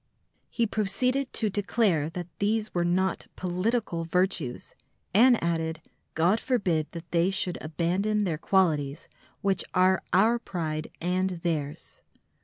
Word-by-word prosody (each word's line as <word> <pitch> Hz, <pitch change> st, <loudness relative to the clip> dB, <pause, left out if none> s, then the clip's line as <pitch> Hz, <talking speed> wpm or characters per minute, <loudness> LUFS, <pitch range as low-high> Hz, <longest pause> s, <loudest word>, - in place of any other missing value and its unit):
He 235 Hz, -, 0 dB
proceeded 250 Hz, +6 st, 0 dB
to 215 Hz, -3 st, 0 dB
declare 190 Hz, -6 st, +1 dB
that 175 Hz, +1 st, -5 dB
these 215 Hz, +1 st, 0 dB
were 175 Hz, -, +1 dB
not 185 Hz, +2 st, 0 dB
"political 185 Hz, 0 st, -1 dB
virtues," 180 Hz, -7 st, -1 dB, 0.4 s
and 240 Hz, +4 st, +6 dB
added, 165 Hz, -1 st, -1 dB, 0.4 s
"God 175 Hz, +7 st, +3 dB
forbid 180 Hz, -, 0 dB
that 170 Hz, 0 st, -9 dB
they 170 Hz, +1 st, +3 dB
should 190 Hz, -2 st, -1 dB
abandon 180 Hz, +7 st, 0 dB
their 165 Hz, -6 st, -1 dB
qualities, 160 Hz, -6 st, +1 dB, 0.3 s
which 195 Hz, -1 st, +1 dB
are 185 Hz, 0 st, +4 dB
our 220 Hz, +6 st, +4 dB
pride 160 Hz, -8 st, -4 dB
and 185 Hz, +2 st, 0 dB
theirs!" 150 Hz, -4 st, -3 dB
185 Hz, 125 wpm, -27 LUFS, 165-210 Hz, 0.4 s, and